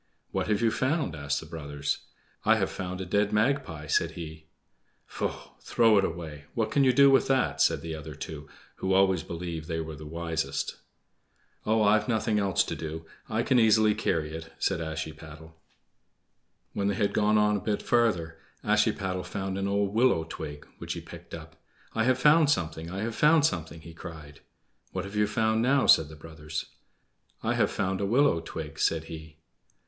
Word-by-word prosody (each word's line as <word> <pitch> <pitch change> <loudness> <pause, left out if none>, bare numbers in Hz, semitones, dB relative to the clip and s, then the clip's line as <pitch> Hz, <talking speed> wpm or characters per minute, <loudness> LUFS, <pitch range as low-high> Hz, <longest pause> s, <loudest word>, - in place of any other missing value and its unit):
"What - - -1
have 105 +1 +1
you 115 - +4
found?" 130 - 0
asked 70 -1 -2
the - - -10
brothers. 75 -3 -4 0.4
"I - - +5
have - - 0
found 90 -1 -5
a - - -4
dead 100 +3 +1
magpie," 105 - 0
said 75 - +1
he. 80 -1 -8 0.6
"Faugh! - - -5
throw 115 -3 +4
it - - +2
away; 80 -4 -5
what 110 -2 0
can 140 +4 +3
you 130 - +5
do 140 +2 +6
with 135 - +4
that?" 135 -1 +1
said - - +3
the 80 -1 -4
other 80 -2 -7
two, 75 -1 -8 0.3
who 95 0 0
always 95 -3 +4
believed 85 -1 -6
they 80 -2 -2
were 80 -1 -5
the 75 +1 -10
wisest. 80 -3 -3 0.9
"Oh, 110 0 +3
I've 105 +1 +3
nothing 110 -2 +1
else 100 -2 +2
to - - -4
do. 80 0 -6 0.2
I 110 +1 0
can 130 0 +3
easily 110 -1 +5
carry 80 -6 -1
it," 80 0 -7
said 95 -3 0
Ashiepattle. 80 0 -7 1.2
When 100 - -1
they 100 - +1
had 100 +1 0
gone 105 0 +3
on 105 0 +3
a - - -6
bit 105 0 -2
farther 90 -10 +1 0.2
Ashiepattle 90 -1 +1
found 95 +1 -3
an 100 0 -1
old 100 0 0
willow 115 -8 +3
twig, 75 -2 -7
which - - -4
he - - -6
picked - - -10
up. - - -12 0.3
"I 110 0 +1
have 130 0 +3
found 150 +3 +5
something! 80 - -1
I 95 +3 -4
have 115 +1 -2
found 150 +5 +5
something!" 80 - -2
he 85 +1 -11
cried. 80 -4 -10 0.5
"What 95 0 -3
have 100 +2 -8
you 105 0 +3
found 110 +1 +1
now?" 135 +3 +3
said 80 -2 +6
the 80 - -10
brothers. 75 0 -6 0.8
"I - - +1
have - - +2
found 95 +1 -1
a 100 - 0
willow 125 -4 +3
twig," 80 -2 -7
said 80 -1 +1
he. 80 -1 -10
95 Hz, 185 wpm, -28 LUFS, 80-110 Hz, 1.2 s, do